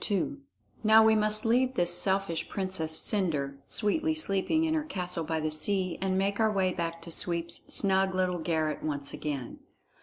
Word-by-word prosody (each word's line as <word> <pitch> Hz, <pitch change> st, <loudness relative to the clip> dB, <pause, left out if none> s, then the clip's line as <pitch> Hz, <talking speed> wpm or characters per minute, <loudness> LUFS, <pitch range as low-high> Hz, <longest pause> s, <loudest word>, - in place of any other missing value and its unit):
II 205 Hz, -, -1 dB, 0.5 s
Now 220 Hz, +1 st, +7 dB
we 220 Hz, -, +5 dB
must 215 Hz, 0 st, +2 dB
leave 250 Hz, +3 st, +2 dB
this 175 Hz, -4 st, +4 dB
selfish 190 Hz, -2 st, -1 dB
Princess 185 Hz, -5 st, -2 dB
Cendre 150 Hz, -9 st, -2 dB
sweetly 315 Hz, +10 st, 0 dB
sleeping 315 Hz, +3 st, +1 dB
in 320 Hz, -1 st, +1 dB
her 315 Hz, -1 st, 0 dB
castle 180 Hz, -, -2 dB
by 160 Hz, 0 st, -2 dB
the 155 Hz, 0 st, -2 dB
sea 185 Hz, +4 st, -1 dB
and 190 Hz, -1 st, 0 dB
make 200 Hz, +2 st, 0 dB
our 220 Hz, -1 st, +3 dB
way 190 Hz, -3 st, +1 dB
back 165 Hz, -1 st, -4 dB
to 170 Hz, -, -8 dB
Sweep's 170 Hz, 0 st, 0 dB
snug 190 Hz, -1 st, +2 dB
little 180 Hz, -1 st, 0 dB
garret 160 Hz, -2 st, -1 dB
once 145 Hz, -2 st, -3 dB
again. 140 Hz, -5 st, -5 dB
185 Hz, 175 wpm, -29 LUFS, 165-210 Hz, 0.5 s, Now